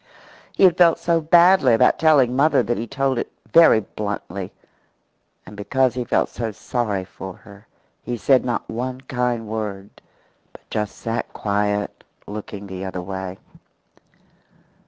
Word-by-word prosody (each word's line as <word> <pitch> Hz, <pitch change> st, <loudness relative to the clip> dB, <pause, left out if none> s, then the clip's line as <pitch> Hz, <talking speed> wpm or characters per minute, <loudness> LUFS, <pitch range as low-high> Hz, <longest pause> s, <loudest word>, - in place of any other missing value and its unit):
He -, -, +1 dB
had 180 Hz, -2 st, +6 dB
felt 170 Hz, -2 st, +5 dB
so 170 Hz, -1 st, +1 dB
badly 170 Hz, -5 st, +5 dB
about -, -, +3 dB
telling 140 Hz, -6 st, +4 dB
mother 145 Hz, +4 st, +3 dB
that 120 Hz, -2 st, -2 dB
he 115 Hz, -, -4 dB
told 135 Hz, 0 st, -1 dB
it -, -, -5 dB, 0.2 s
very 165 Hz, -9 st, +7 dB
bluntly. 100 Hz, -2 st, -5 dB, 0.9 s
And 105 Hz, -, -12 dB
because 130 Hz, +4 st, +1 dB
he 125 Hz, 0 st, -3 dB
felt -, -, +1 dB
so 115 Hz, -2 st, -4 dB
sorry 105 Hz, -3 st, -3 dB
for 95 Hz, 0 st, -9 dB
her 100 Hz, 0 st, -16 dB, 0.3 s
he 120 Hz, -1 st, -4 dB
said 130 Hz, +3 st, +3 dB
not 120 Hz, -2 st, -2 dB
one 125 Hz, +3 st, -4 dB
kind 125 Hz, -3 st, -2 dB
word, 105 Hz, -2 st, -5 dB, 0.6 s
but -, -, -17 dB
just 105 Hz, -2 st, -3 dB
sat 115 Hz, 0 st, -4 dB
quiet, 105 Hz, 0 st, -2 dB, 0.2 s
looking 105 Hz, -1 st, -7 dB
the 95 Hz, -1 st, -7 dB
other 95 Hz, -1 st, -5 dB
way. 95 Hz, 0 st, -6 dB
115 Hz, 145 wpm, -21 LUFS, 100-130 Hz, 0.9 s, very